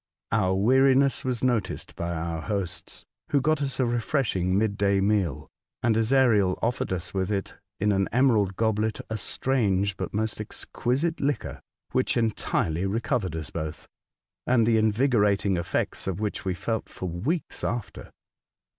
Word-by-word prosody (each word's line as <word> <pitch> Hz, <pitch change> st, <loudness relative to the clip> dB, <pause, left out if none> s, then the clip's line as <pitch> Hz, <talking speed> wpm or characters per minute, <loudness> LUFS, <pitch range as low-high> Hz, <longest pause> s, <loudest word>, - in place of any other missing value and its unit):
Our 95 Hz, -4 st, +2 dB
weariness 130 Hz, +6 st, +4 dB
was 125 Hz, -2 st, -2 dB
noticed 120 Hz, -7 st, -1 dB
by 85 Hz, 0 st, -3 dB
our 80 Hz, 0 st, -3 dB
hosts, 100 Hz, -3 st, -5 dB, 0.2 s
who 140 Hz, -, +3 dB
got 155 Hz, +2 st, +1 dB
us 135 Hz, -1 st, -2 dB
a 130 Hz, -, +3 dB
refreshing 115 Hz, -6 st, 0 dB
mid 105 Hz, -1 st, +1 dB
day 100 Hz, -1 st, +2 dB
meal, 95 Hz, -6 st, 0 dB, 0.4 s
and 115 Hz, -3 st, +3 dB
Ezariel 110 Hz, -5 st, +3 dB
offered 120 Hz, -3 st, -1 dB
us 90 Hz, -1 st, -3 dB
with 95 Hz, +1 st, -1 dB
it, 100 Hz, -2 st, -2 dB, 0.3 s
in 105 Hz, +1 st, +2 dB
an 95 Hz, -1 st, +1 dB
emerald 110 Hz, -6 st, +3 dB
goblet, 110 Hz, 0 st, 0 dB
a 110 Hz, -, -1 dB
strange 100 Hz, -7 st, 0 dB
but -, -, -4 dB
most 110 Hz, +1 st, -2 dB
exquisite 135 Hz, +9 st, -2 dB
liquor, 140 Hz, -3 st, -2 dB, 0.3 s
which 130 Hz, 0 st, +1 dB
entirely 95 Hz, -6 st, 0 dB
re 105 Hz, +4 st, 0 dB
covered 115 Hz, -, -1 dB
us 80 Hz, -3 st, -6 dB
both, 80 Hz, -1 st, -5 dB, 0.6 s
and 120 Hz, -3 st, +4 dB
the 115 Hz, -1 st, +4 dB
invigorating 105 Hz, -4 st, +2 dB
effects 85 Hz, +2 st, -2 dB
of 95 Hz, 0 st, -2 dB
which 105 Hz, -2 st, -3 dB
we 95 Hz, -1 st, 0 dB
felt 110 Hz, +4 st, -3 dB
for -, -, -7 dB
weeks 115 Hz, -, -3 dB
after. 115 Hz, -4 st, -4 dB
110 Hz, 155 wpm, -26 LUFS, 95-125 Hz, 0.6 s, weariness